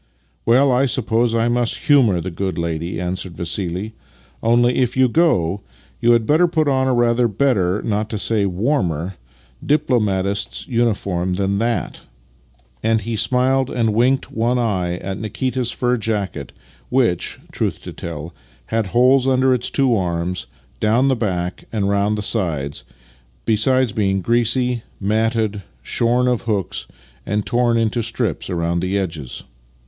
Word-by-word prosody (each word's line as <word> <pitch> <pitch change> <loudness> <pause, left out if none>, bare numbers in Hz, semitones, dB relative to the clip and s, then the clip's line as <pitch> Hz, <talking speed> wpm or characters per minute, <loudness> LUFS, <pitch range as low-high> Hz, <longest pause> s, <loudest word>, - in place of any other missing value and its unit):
" - - -42
Well, 130 +4 +5
I 130 +2 +3
suppose 115 -1 +1
I 115 0 +2
must 120 -1 0
humour 125 -11 +4
the 90 +2 -5
good 95 0 -3
lady," 85 0 -3
answered 90 0 -4
Vassih. 90 +4 -3 0.3
" - - -31
Only, 120 +2 +3
if 125 -1 0
you 130 0 +5
go, 105 - +2 0.4
you 120 +1 +4
had 115 -2 +2
better 160 +7 +4
put 160 -2 0
on 130 -1 +2
a 130 - +2
rather 120 0 +3
better, 105 -5 +1
not 105 0 -1
to 110 - -3
say 105 -1 +1
warmer, 95 - -1 0.5
diplo 145 -5 +2
matist's 100 -1 -1
uniform 100 -7 0
than 100 +1 0
that," 115 -4 -2 0.4
— - - -35
and 110 0 +2
he 115 +2 -3
smiled 130 +4 +2
and - - -6
8 - - -7
Master - - -4
and 115 - +2
Man 105 - -2
winked 130 +4 +2
one 120 +3 0
eye 95 -7 0
at 95 +2 -5
Nikita's 125 +3 -2
fur 125 +1 0
jacket, 100 - -3 0.4
which, 120 -9 0
truth - - -2
to - - -7
tell, 80 0 -7 0.4
had 110 -3 +1
holes 125 +4 +4
under 130 0 +3
its 125 -1 0
two 135 -4 +2
arms, 90 - -2 0.3
down 115 +5 +3
the 130 - +3
back, 90 -6 -3
and 105 -3 0
round 100 +1 +1
the 105 - -3
sides, 75 - -2 0.6
besides 125 +3 +2
being 95 -2 0
greasy, 120 +3 +2 0.2
matted, 110 0 0 0.2
shorn 120 +2 +1
of 125 -2 +1
hooks, 100 -4 -2 0.4
and 105 +5 -2
torn 120 -1 +2
into 115 +1 0
strips 115 -2 -2
round 85 -1 -1
the 95 +2 0
edges. 80 -9 -4
110 Hz, 165 wpm, -20 LUFS, 95-125 Hz, 0.6 s, Well